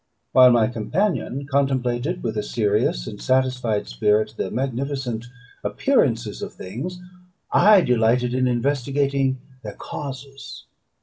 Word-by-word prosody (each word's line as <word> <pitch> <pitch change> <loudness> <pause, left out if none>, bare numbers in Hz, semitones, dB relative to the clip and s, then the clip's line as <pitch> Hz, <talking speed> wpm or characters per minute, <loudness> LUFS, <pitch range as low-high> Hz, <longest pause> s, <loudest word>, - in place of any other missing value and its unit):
While 130 -1 +8
my 120 -2 +4
companion 140 - -2
contemplated 135 +3 0
with 110 -2 -2
a 105 - 0
serious 105 - 0
and 105 - -8
satisfied 130 -5 0
spirit 105 - +1
the - - -3
magnificent 130 -2 -3 0.4
appearances 120 - 0
of - - -6
things, 135 - -6 0.5
I 205 +1 +6
delighted 120 -1 +2
in 130 0 +1
investigating 135 +1 0 0.2
their 105 -3 -7
causes. 135 0 -8
125 Hz, 115 wpm, -22 LUFS, 115-140 Hz, 0.5 s, While